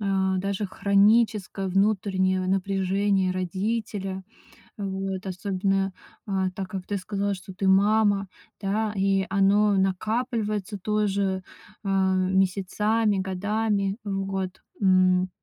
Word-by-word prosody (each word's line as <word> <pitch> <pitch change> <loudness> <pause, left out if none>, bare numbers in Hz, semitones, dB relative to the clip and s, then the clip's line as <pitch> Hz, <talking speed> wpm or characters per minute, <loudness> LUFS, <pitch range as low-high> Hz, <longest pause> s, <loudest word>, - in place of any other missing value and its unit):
а, 190 -2 +1
даже 200 +2 -2
хроническое 200 0 +2
внутреннее 190 -1 +1
в 185 - -2
напряжение 195 0 +1
родителя. 190 +1 -3 0.6
Вот, 195 -1 -4
особенно, 195 +1 -1 0.3
а, 190 -2 0
так 190 +1 -5
как 190 -1 -6
ты 205 - -1
сказала, 200 +1 -2
что 185 +1 -11
ты 190 +1 -1
мама, 200 +1 +3 0.3
да, 215 +2 -1
и 195 0 +2
оно 200 +2 +3
накапливается 210 +1 -1
тоже, 200 -2 0 0.4
а, 190 -1 +2
месяцами, 195 +3 +1
годами 200 +1 -1
в 195 -2 -2
год. 190 -1 -4 0.2
М, 185 -1 +4
195 Hz, 110 wpm, -25 LUFS, 190-205 Hz, 0.6 s, М